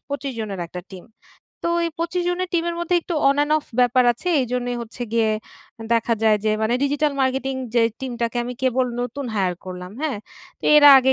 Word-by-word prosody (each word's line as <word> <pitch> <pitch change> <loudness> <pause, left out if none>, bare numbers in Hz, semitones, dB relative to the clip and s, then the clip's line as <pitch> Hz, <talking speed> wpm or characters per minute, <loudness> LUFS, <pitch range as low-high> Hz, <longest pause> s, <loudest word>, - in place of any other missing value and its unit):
২৫ 280 -1 -3
জনের 200 -4 -4
একটা 180 +2 -7
টিম। 185 -2 -10 0.6
তো 340 - +2 0.2
এই 335 - -1
২৫ 340 +2 -1
জনের 360 +1 -1
টিমের 340 0 0
মধ্যে 345 +1 0
একটু 345 - -4
অন 280 - +3
অ্যান্ড 295 +1 +2
অফ 295 - -12 0.2
ব্যাপার 250 +1 +4
আছে। 360 +10 -6
এইজন্য 250 0 -2 0.2
হচ্ছে 235 +2 -8
গিয়ে 225 -2 +2 0.6
দেখা 230 0 +2
যায় 220 -1 +5
যে 215 - +3
মানে 225 +3 +2
ডিজিটাল 290 +1 +1
মার্কেটিং 265 0 0 0.2
যে 235 - +5 0.2
টিমটাকে 240 -2 -3
আমি 250 +1 -5
কেবল 255 0 +2
নতুন 250 +3 -4
হাইয়ার 185 -3 +1
করলাম। 180 0 -7
হ্যাঁ, 280 -9 -1 0.4
তো - - -11
এরা 290 -1 +9
আগে 265 +1 +3
255 Hz, 195 wpm, -22 LUFS, 225-290 Hz, 0.6 s, এরা